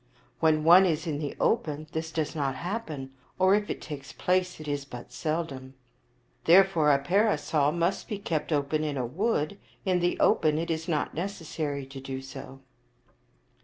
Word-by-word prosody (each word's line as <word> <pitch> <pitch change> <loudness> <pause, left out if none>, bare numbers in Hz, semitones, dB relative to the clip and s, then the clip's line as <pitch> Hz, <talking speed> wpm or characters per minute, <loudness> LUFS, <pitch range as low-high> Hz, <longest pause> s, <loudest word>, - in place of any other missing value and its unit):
When 155 -1 +3
one 180 +4 +8
is 160 -1 -1
in 150 -3 -2
the 145 -2 -4
open 155 -8 0
this 160 0 -3
does 160 -1 -2
not 140 -3 -1
happen, 160 - -5 0.3
or, 185 +1 +5
if 205 0 +1
it - - -3
takes 145 -3 -7
place, 180 +1 0
it 155 - -8
is 145 -1 -2
but 125 -3 -10
seldom. 135 -2 -3 0.7
Therefore 170 -3 +6
a 140 - +5
parasol 155 -3 +2
must 170 +3 -1
be 210 - -3
kept 165 -6 -2
open 150 +1 +1
in 150 -2 -2
a 125 - -1
wood; 190 - -1 0.3
in 185 -2 +2
the 175 0 0
open 155 -1 +3
it 165 +1 -1
is 160 +1 -3
not 155 -4 -1
necessary 160 -5 -4
to 135 0 -9
do 135 0 -5
so." 135 0 -10
155 Hz, 170 wpm, -28 LUFS, 140-175 Hz, 0.7 s, one